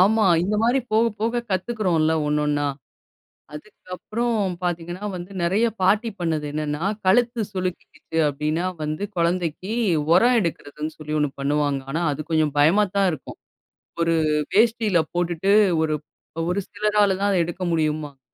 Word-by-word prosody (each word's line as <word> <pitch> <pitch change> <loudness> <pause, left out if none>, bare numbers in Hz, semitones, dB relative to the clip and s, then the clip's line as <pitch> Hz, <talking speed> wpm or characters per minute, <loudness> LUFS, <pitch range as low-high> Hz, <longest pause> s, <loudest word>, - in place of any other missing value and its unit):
ஆமா. 215 +3 +4 0.2
இந்த 200 +4 0
மாரி 245 +4 +3
போக, 220 +1 +4 0.2
போக 230 +2 0
கத்துக்கிறோம்ல, 185 -5 +1
ஒன்னொன்னா? 150 -1 0 0.9
அதுக்கப்புறம் 210 +4 -3
பார்த்தீங்கன்னா 175 +2 -3
வந்து, 180 +2 -8
நிறைய 195 +7 +2 0.2
பாட்டி 210 +5 +3
பண்ணது 160 -3 -1
என்னன்னா, 150 0 -3 0.2
கழுத்து 235 +4 +3
சுளுக்கிக்கிச்சு 185 -3 -5
அப்படின்னா 150 +4 -2 0.2
வந்து 155 +5 -3
குழந்தைக்கி, 170 +2 -1 0.4
உரம் 240 +7 +5
எடுக்கிறதுன்னு 155 -4 -4
சொல்லி 155 -1 -6
ஒண்ணு 150 - +1
பண்ணுவாங்க. 145 0 0
ஆனா, 165 +4 -1
அது 145 - -4
கொஞ்சம் 155 -2 +2
பயமா 170 +9 +5
தான் 195 -1 +4
இருக்கும். 155 -5 -8 0.6
ஒரு 165 0 +2 0.4
வேஷ்டில 220 -4 +3
போட்டுட்டு 175 +2 0 0.3
ஒரு 155 - 0 0.6
ஒரு 180 +3 0
சிலரால 210 -2 +2
தான் 200 +1 +1
அத 195 - +2
எடுக்க 175 +2 -5
முடியும்பாங்க. 155 -3 -1
175 Hz, 130 wpm, -23 LUFS, 155-205 Hz, 0.9 s, உரம்